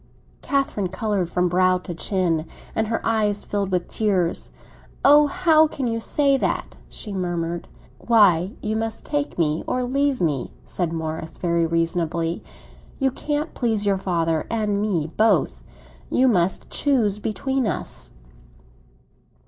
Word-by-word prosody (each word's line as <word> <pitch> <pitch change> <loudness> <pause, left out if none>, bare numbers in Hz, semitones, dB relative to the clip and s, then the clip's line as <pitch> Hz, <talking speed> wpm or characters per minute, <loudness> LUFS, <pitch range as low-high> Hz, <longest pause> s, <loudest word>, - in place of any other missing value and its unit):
Catherine 275 -8 0
coloured 195 -2 -1
from 180 0 +1
brow 185 +1 +3
to 180 -1 -7
chin, 170 -2 -1 0.3
and 220 0 0
her 225 +1 -2
eyes 210 -2 +1
filled 200 -2 -1
with 180 -1 0
tears. 190 -6 0 0.6
"Oh, 295 +2 +7
how 320 -2 +4
can 280 -3 -4
you 230 -1 -1
say 275 +4 +2
that?" - - -2
she 210 - -6
murmured. 175 -2 -2 0.3
"Why, 200 -5 +4
you 215 0 -1
must 225 0 -3
take 290 0 -2
me 155 -2 +1
or 255 - 0
leave 275 +2 +1
me," 150 -7 -1
said 175 -3 -2
Morris, 160 0 -4
very 170 -1 +1
reasonably. 165 0 -1 0.5
"You 270 -1 +1
can't 295 +4 -3
please 225 -4 0
your 195 -1 +2
father 165 -4 0
and 210 -3 0
me 170 -7 -1
both; 205 - +2 0.5
you 260 - +3
must 185 -6 +1
choose 230 -8 +1
between 260 +4 -1
us." - - -3
200 Hz, 140 wpm, -23 LUFS, 170-240 Hz, 0.6 s, Oh